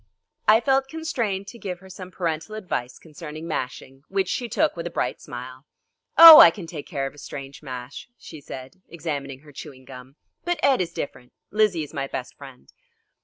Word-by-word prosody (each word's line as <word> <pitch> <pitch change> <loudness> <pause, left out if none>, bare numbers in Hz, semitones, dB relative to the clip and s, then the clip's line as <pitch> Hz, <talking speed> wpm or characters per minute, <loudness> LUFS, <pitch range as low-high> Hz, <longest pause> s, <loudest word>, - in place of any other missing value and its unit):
I 220 +2 +6
felt 270 0 +2
constrained 245 -11 -3
to 235 - -12
give 185 -4 -5
her 190 +1 -16
some 185 -1 -10
parental 170 +2 -4
advice 175 - -4
concerning 155 0 -9
mashing, 135 -2 -5
which 195 -1 -1
she 240 -2 -2
took - - +1
with 170 0 -5
a - - -4
bright - - -3
smile. 130 +3 -9 0.5
"Oh, 325 -2 +13
I - - +11
can 175 +1 -8
take 160 -3 -8
care 140 -6 -3
of 135 - -6
a 145 - -15
strange 135 -1 -9
mash," 130 - -8
she 155 -3 -12
said, 130 +5 -10
examining 140 -5 -5
her 150 -1 -16
chewing 130 -1 -11
gum, 130 +1 -12 0.3
"but 350 +1 -1
Ed 270 -7 +4
is 175 - -3
different. 125 -3 -7 0.2
Lizzie 210 -6 +2
is 150 - -11
my 135 0 -3
best 130 -1 -6
friend." 135 -3 -14
160 Hz, 190 wpm, -24 LUFS, 135-195 Hz, 0.5 s, Oh